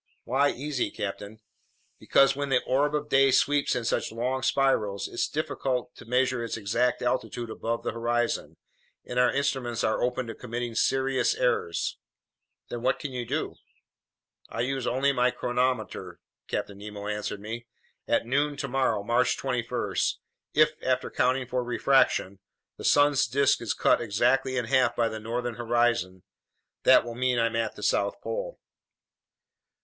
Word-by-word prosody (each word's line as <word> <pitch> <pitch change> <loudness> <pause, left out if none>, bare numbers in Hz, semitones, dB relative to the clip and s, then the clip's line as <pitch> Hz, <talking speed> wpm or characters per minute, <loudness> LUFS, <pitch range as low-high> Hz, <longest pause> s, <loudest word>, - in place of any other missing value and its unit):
"Why 140 +3 +2
easy, 140 0 -2
captain?" 100 +2 -6 0.6
"Because 135 0 +4
when 140 0 -3
the 125 -2 +2
orb 145 +3 +1
of 150 0 -2
day 135 -1 +4
sweeps 145 +2 +2
in 120 - -2
such - - 0
long 125 +4 -2
spirals, 110 -8 +1
it's - - -2
difficult 135 -5 -2
to - - -12
measure 125 0 +1
its 115 - -3
exact 115 +5 0
altitude 120 -2 -2
above 115 +1 -3
the - - -1
horizon, 120 +1 -1 0.5
and 125 - -2
our 125 -1 +4
instruments 135 -4 -1
are 110 - +1
open 125 0 0
to 115 - -6
committing 120 0 -5
serious 135 - +1
errors." 455 -2 0 0.7
"Then 120 - -5
what - - +1
can 145 - -6
you 125 -2 -4
do?" - - -2 0.9
"I 115 - -3
use 130 0 -1
only 135 +3 +2
my 125 -1 +3
chronometer," 125 -4 -2 0.3
Captain 100 -1 -4
Nemo 105 0 -8
answered 105 -1 -3
me. 115 +3 -7 0.4
"At - - +2
noon 145 +4 0
tomorrow, 135 -6 0
March 120 +3 +2
21, 125 -3 -2 0.6
if, - - +5
after - - 0
accounting 130 +1 +1
for 125 0 -2
refraction, 120 -6 +2 0.4
the - - -10
sun's 145 -2 +4
disk 135 +2 +2
is 115 - -2
cut - - +3
exactly 130 +4 +1
in 120 - 0
half 130 +2 +2
by 115 -1 +1
the 110 - -5
northern 120 +2 -3
horizon, 120 -6 0 0.6
that - - +7
will 120 - -5
mean 125 +1 0
I'm 115 -1 +1
at 115 -1 -1
the - - -9
South - - +1
Pole." - - -5
125 Hz, 155 wpm, -27 LUFS, 115-135 Hz, 0.9 s, that